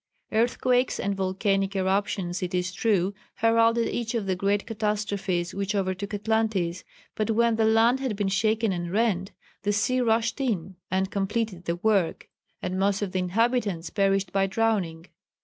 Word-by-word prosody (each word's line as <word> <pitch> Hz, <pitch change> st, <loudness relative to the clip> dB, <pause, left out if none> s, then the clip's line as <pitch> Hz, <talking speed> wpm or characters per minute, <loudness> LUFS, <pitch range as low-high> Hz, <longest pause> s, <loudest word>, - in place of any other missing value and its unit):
Earthquakes 245 Hz, +3 st, +2 dB
and 200 Hz, -, 0 dB
volcanic 195 Hz, +1 st, 0 dB
eruptions, 190 Hz, -1 st, 0 dB
it 180 Hz, 0 st, -2 dB
is 180 Hz, +1 st, -1 dB
true, 200 Hz, -1 st, +1 dB, 0.2 s
heralded 230 Hz, +1 st, +3 dB
each 235 Hz, 0 st, -2 dB
of 220 Hz, -3 st, -1 dB
the 190 Hz, -1 st, 0 dB
great 200 Hz, +2 st, 0 dB
catastrophes 205 Hz, -5 st, -2 dB
which 200 Hz, +1 st, -2 dB
overtook 195 Hz, +1 st, -2 dB
Atlantis, 205 Hz, -5 st, 0 dB, 0.3 s
but 215 Hz, +1 st, -2 dB
when 230 Hz, +1 st, +3 dB
the 220 Hz, 0 st, +2 dB
land 225 Hz, +3 st, +4 dB
had 260 Hz, -5 st, -2 dB
been 200 Hz, -1 st, -1 dB
shaken 215 Hz, +2 st, +1 dB
and 175 Hz, -1 st, -3 dB
rent, 200 Hz, -2 st, +1 dB, 0.3 s
the 205 Hz, -, 0 dB
sea 255 Hz, +5 st, +1 dB
rushed 230 Hz, +2 st, +1 dB
in 195 Hz, -8 st, -2 dB
and 190 Hz, +1 st, 0 dB
completed 195 Hz, -2 st, -2 dB
the 170 Hz, -, 0 dB
work, 195 Hz, -2 st, +1 dB, 0.4 s
and 185 Hz, 0 st, -2 dB
most 200 Hz, +1 st, +1 dB
of 195 Hz, -, -3 dB
the 185 Hz, -, -1 dB
inhabitants 200 Hz, -2 st, 0 dB
perished 195 Hz, -2 st, +1 dB
by 195 Hz, 0 st, +2 dB
drowning. 190 Hz, -6 st, 0 dB
200 Hz, 160 wpm, -26 LUFS, 185-225 Hz, 0.4 s, land